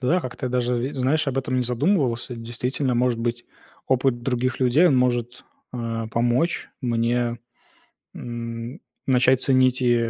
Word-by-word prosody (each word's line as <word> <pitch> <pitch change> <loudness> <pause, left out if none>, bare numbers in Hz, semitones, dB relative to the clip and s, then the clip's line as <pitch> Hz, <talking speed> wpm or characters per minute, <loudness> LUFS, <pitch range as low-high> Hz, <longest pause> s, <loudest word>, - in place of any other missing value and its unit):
да, 130 +6 +2
я 180 - +2
как-то 130 -2 -5
даже 125 0 0
и, - - -9
знаешь, 135 +4 +1
об 135 -1 -1
этом 130 -1 -1
не 125 - +2
задумывался. 125 - 0
Действительно, 125 +3 -2
может 120 -1 +1
быть, 120 +1 -2 0.4
опыт 130 -2 +1
других 130 0 -1
людей 130 +8 +5
он 140 - +4
может, 125 -1 0 0.3
а, 115 -2 -3
помочь 120 +9 0
мне, 120 0 0 0.8
м, 115 +3 -6 0.3
начать 130 0 +3
ценить 130 -1 +3
и 120 -2 +2
125 Hz, 150 wpm, -23 LUFS, 120-130 Hz, 0.8 s, людей